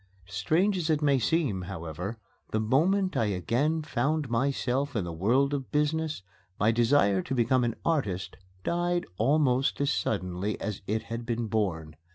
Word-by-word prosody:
Strange 165 - +1
as 165 -2 -2
it 155 -1 +2
may 140 -2 +4
seem, 125 - +1
however, 90 +3 -5 0.3
the 110 - 0
moment 180 - +2
I 115 - +2
again 125 - 0
found 145 0 -1
myself 135 +2 0
in 105 - 0
the 85 -1 -5
world 125 - +2
of 135 -2 -3
business 155 -3 0 0.4
my 105 +3 +4
desire 115 -4 +3
to 135 - -3
become 125 +1 +3
an 115 -1 0
artist 105 - -1 0.3
died 175 0 0
almost 135 +1 +2
as 140 0 +2
suddenly 95 0 -2
as 105 -2 -4
it 110 +2 -1
had 115 +1 -5
been 120 -1 -2
born. 85 -9 -2
120 Hz, 160 wpm, -28 LUFS, 105-150 Hz, 0.4 s, may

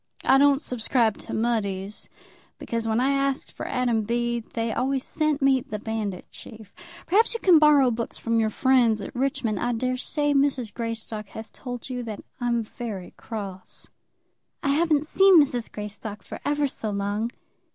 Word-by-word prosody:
I 270 - +6
don't 285 0 +4
subscribe 230 -2 0
to - - -9
Mudie's, 210 -3 -2 0.5
because 230 -1 -3
when 220 +1 +1
I 265 +2 +2
asked 275 0 0
for - - -6
'Adam 245 -3 +1
Bede,' 235 +1 -1
they 230 -1 -1
always 265 +1 0
sent 305 -2 0
me 270 -1 +4
the 210 - -6
'Bandit 210 -3 -4
Chief.' 220 -3 -11 0.3
Perhaps 440 +7 +3
you - - -2
can 360 -7 +6
borrow 290 -4 +6
books 230 0 -3
from 230 0 0
your 220 -1 +2
friends 240 -2 +3
at - - -7
Richmond. 245 -5 -1
I 240 0 0
daresay 255 +5 0
Mrs. 275 -5 +1
Greystock 225 -2 -5
has 220 +2 -9
told 245 -2 -7
you 250 -2 -4
that 220 -4 -6 0.2
I'm 240 -2 0
very 210 -4 -7
cross." 195 -4 -8 0.7
"I 280 - +1
haven't 305 0 +2
seen 385 +2 +6
Mrs. 250 -5 +1
Greystock 210 0 -7
for - - -8
ever 290 0 +1
so 225 -4 -5
long." 205 +2 -1
240 Hz, 165 wpm, -25 LUFS, 220-275 Hz, 0.7 s, I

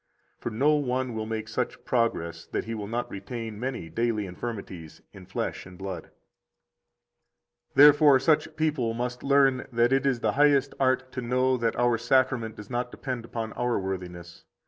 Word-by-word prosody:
60 - - -42
For - - -2
no 135 +7 +2
one 130 -3 -1
will 110 -1 -4
make 110 -1 -4
such 120 +2 -3
progress 85 -9 -1
that - - -2
he 115 - -5
will 105 -2 -5
not 120 +3 -3
retain 110 +1 -6
many 125 -8 -4
daily 110 +3 -1
infirmities 90 -4 -7
in 95 -3 -13
flesh 95 - -3
and 90 0 -13
blood. 95 -3 -6 1.6
61 - - -50
Therefore 145 -1 +8
such 155 +2 +2
people 150 -8 0
must 125 +1 -3
learn 135 -2 +3
that 120 +2 +3
it 135 +1 +2
is 125 -4 0
the 110 - +2
highest 145 +2 +3
art 130 -1 +1
to 125 - -4
know 130 +2 +2
that 115 -2 0
our 120 -1 +2
Sacrament 120 -2 +1
does 105 +1 -11
not 125 0 -1
depend 125 -2 -5
upon 115 -1 -5
our 125 -1 0
worthiness. 90 -3 -6
120 Hz, 175 wpm, -27 LUFS, 110-130 Hz, 1.6 s, Therefore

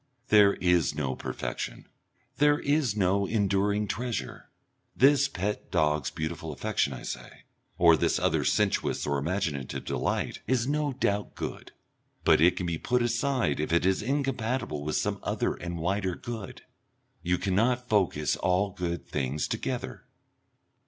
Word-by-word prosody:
There 105 -2 +6
is 90 -4 +2
no 70 -4 -2
perfection, - - -5 0.5
there 145 0 +4
is 145 -7 +1
no 100 0 +2
enduring 100 0 +1
treasure. 120 +2 -4 0.5
This 140 +1 +5
pet 105 -4 -3
dog's 75 -4 +1
beautiful 80 0 -4
affection, 70 0 -1
I 65 -2 -7
say, - - -7 0.3
or 85 -2 +7
this - - +1
other - - +1
sensuous - - +1
or 70 -1 0
imaginative 80 -4 -2
delight, - - -2
is 125 -2 +2
no 150 0 0
doubt 105 -5 -1
good, - - -6 0.5
but - - +5
it 85 +2 +5
can 90 - -2
be 85 -2 -2
put 125 -1 +1
aside 120 - 0
if 75 - -2
it 85 +1 +3
is 95 0 +2
incompatible 125 - -1
with 75 +1 -2
some - - -1
other - - -1
and 85 0 -6
wider 95 +2 -1
good. 110 -3 -7 0.6
You 90 +1 +1
cannot 115 +7 +1
focus 90 - +1
all 95 +2 +1
good 85 -5 -4
things 70 +1 -2
together. - - -4
95 Hz, 145 wpm, -28 LUFS, 80-120 Hz, 0.6 s, or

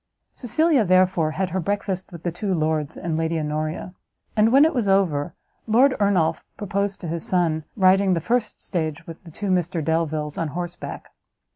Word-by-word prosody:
Cecilia, 295 +2 +2
therefore, 185 -3 +3
had 190 -1 0
her 190 - -1
breakfast 195 0 -3
with 170 -2 -10
the 175 - -1
two 185 +2 -2
lords 155 -1 -1
and 170 -2 -3
Lady 165 0 0
Honoria; 155 +3 -3 0.4
and 220 +1 +4
when 275 +4 +7
it 320 - +1
was 240 -6 0
over, 180 -7 +1 0.3
Lord 255 +5 +4
Ernolf 195 -6 +2
proposed 200 -1 -2
to 175 - -5
his 165 0 -3
son 165 -4 0
riding 190 -1 +4
the - - 0
first 230 +6 -1
stage 160 -2 -3
with 165 -1 -10
the - - -10
two 195 +4 -3
Mr 175 -3 0
Delviles 155 -2 -1
on 165 - -1
horseback. 175 +3 -6
180 Hz, 175 wpm, -23 LUFS, 160-200 Hz, 0.4 s, when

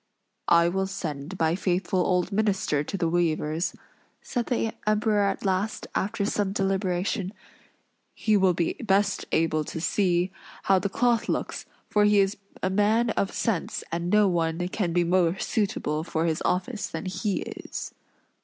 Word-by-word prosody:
"I 170 0 +5
will 190 +2 0
send 160 -2 -5
my 160 0 +3
faithful 185 +1 0
old 180 +1 +1
minister 200 -7 +1
to 195 - -4
the 170 -3 +1
weavers," 165 0 0 0.5
said 245 -2 -2
the 225 -3 0
Emperor 215 0 +2
at 200 +1 0
last, 195 +3 0
after 205 +1 -1
some 200 -1 0
deliberation, 195 0 0 0.8
"he 215 -1 +2
will 190 -3 +4
be 170 -1 0
best 200 -1 +2
able 155 -1 +2
to 160 - -5
see 180 +1 +1 0.3
how 195 -1 +4
the 200 +2 -2
cloth 240 +3 +1
looks; - - -2 0.2
for 210 0 +3
he 210 0 +4
is 195 +2 +2 0.3
a 185 - +2
man 215 +4 +3
of 195 - 0
sense, 215 -9 -1
and 170 +1 -2
no 210 +1 +5
one 170 -1 0
can 185 -3 -1
be 175 +1 +2
more 175 0 +2
suitable 190 -10 -1
for 160 -1 -1
his 160 -1 0
office 205 +5 -1
than - - -6
he 190 +2 -1
is." - - -6
190 Hz, 160 wpm, -26 LUFS, 170-205 Hz, 0.8 s, I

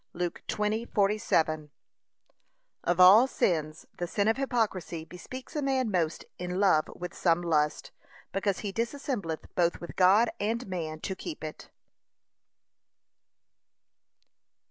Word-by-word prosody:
(Luke 175 0 -3
20:47) 210 -7 0 1.1
Of 175 0 0
all 200 +8 +9
sins, 155 - -1
the 175 - -2
sin 200 +3 0
of 225 - +3
hypocrisy 215 -11 -1
bespeaks 250 - -10
a 300 - 0
man 260 -4 0
most 165 -4 -1
in 180 +1 -3
love 185 -6 +4
with 180 0 -6
some 175 -1 +2
lust, 150 -3 0 0.4
because 195 0 -1
he 200 -2 -4
dissembleth 230 - -3
both 175 -1 +1
with 170 - -8
God 195 +5 +5
and 225 +4 -1
man 160 -4 -4
to 190 - -3
keep 160 - -7
it. 155 -1 -7
185 Hz, 120 wpm, -29 LUFS, 170-220 Hz, 1.1 s, all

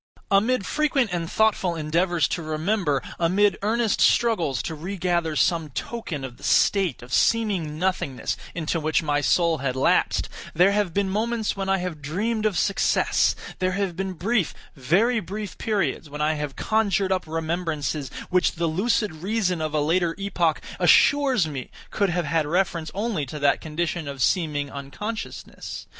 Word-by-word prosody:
Amid 205 +2 +3
frequent 275 -8 +1
and 170 -2 -2
thoughtful 205 -5 +2
endeavors 165 +2 +1
to 175 - -2
remember; 155 -1 0 0.2
amid 195 +4 +2
earnest 220 +1 +1
struggles 170 - +2
to 160 - -4
regather 170 -1 -1
some 165 -1 +1
token 155 - -5
of 120 -2 -9
the - - -17
state 190 -12 +2
of 125 +1 -9
seeming 190 -7 +1
nothingness 175 -7 -1 0.2
into 165 0 -1
which 155 +1 +1
my 145 -1 +1
soul 165 +1 +2
had 130 -1 -2
lapsed, 130 - +2 0.3
there 180 +4 +5
have 205 -3 +1
been 200 +2 0
moments 220 +3 -1
when 195 -1 -3
I 195 - +3
have 180 -5 -5
dreamed 215 +9 -1
of 200 -5 -2
success; 195 - +2 0.2
there 185 0 0
have 195 -2 -1
been 190 +1 -3
brief, 195 +1 0 0.2
very 195 - +2
brief 205 +2 -6
periods 195 - -1
when 150 +1 -7
I 155 +1 +2
have 150 -2 -4
conjured 200 -3 +1
up 185 -3 0
remembrances 160 -3 -2 0.2
which 180 0 +3
the 170 0 -2
lucid 210 +6 +1
reason 185 +1 -1
of 155 -1 -2
a 150 - +2
later 165 +2 +1
epoch 180 -5 0 0.2
assures 270 - +5
me 140 -4 -6 0.2
could 200 -2 +1
have 175 -1 -1
had 155 0 0
reference 170 -1 0
only 205 -6 -1
to 150 - -6
that 145 -1 +2
condition 160 0 -3
of 140 -2 -2
seeming 150 -5 0
unconsciousness. 175 +11 -6
175 Hz, 160 wpm, -24 LUFS, 155-200 Hz, 0.3 s, there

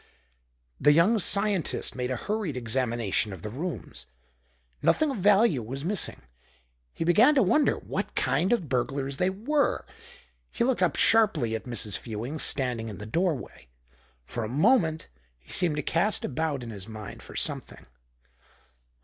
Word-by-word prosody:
The 145 - +5
young 190 +9 +4
scientist 200 -2 +1
made 125 -1 -3
a 130 - -1
hurried 205 - -3
examination 115 -3 0
of 95 -3 -9
the 105 - -5
rooms. 160 - -6 0.7
Nothing 310 -2 +2
of 265 - -5
value 200 - +3
was 135 +6 -6
missing. 200 - -2 0.7
He - - -4
began 220 - +5
to 265 - +4
wonder 300 -1 +2
what - - -5
kind 185 - +1
of 230 -10 0
burglars 135 +1 -2
they 180 - +1
were. 265 +10 -1 0.6
He - - -2
looked 255 0 0
up - - +2
sharply 180 - +4
at 110 - -4
Mrs. 110 -5 0
Fewings 120 +7 -5
standing 125 -4 +1
in 100 - -8
the 105 - -8
doorway. 150 - -3 0.6
For 120 - -4
a 110 - -4
moment 160 - +2 0.3
he - - -13
seemed 170 -4 +4
to 150 - -3
cast 185 +9 +2
about 150 -2 -3
in 115 - -7
his 100 -2 -8
mind 110 -2 -9
for - - -12
something. - - -1
150 Hz, 155 wpm, -26 LUFS, 120-200 Hz, 0.7 s, The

